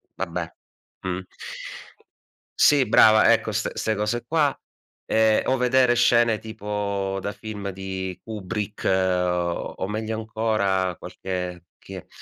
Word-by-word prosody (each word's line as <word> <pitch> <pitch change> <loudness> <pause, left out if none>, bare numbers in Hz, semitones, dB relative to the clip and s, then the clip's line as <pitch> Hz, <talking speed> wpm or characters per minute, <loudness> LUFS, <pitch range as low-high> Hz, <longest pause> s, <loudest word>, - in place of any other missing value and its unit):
vabbè, - - -4 0.5
mh. 95 0 -3 1.4
Sì, 140 -3 +5
brava, 110 0 +6
ecco, - - 0
st - - -2
'ste 110 -1 -1
cose 105 +4 -1
qua. 150 -4 +2 0.5
Ehm, 110 -1 +3
o 130 - +2
vedere 125 0 +3
scene 115 -2 +4
tipo 100 -2 -3
da 100 +2 -3
film 105 -2 -6
di 95 -1 -5
Kubrick, 105 -1 -5
o 90 -1 0
meglio 110 +1 -3
ancora 105 -5 0
qualche 90 -2 -5
che - - -10
105 Hz, 115 wpm, -24 LUFS, 95-110 Hz, 1.4 s, brava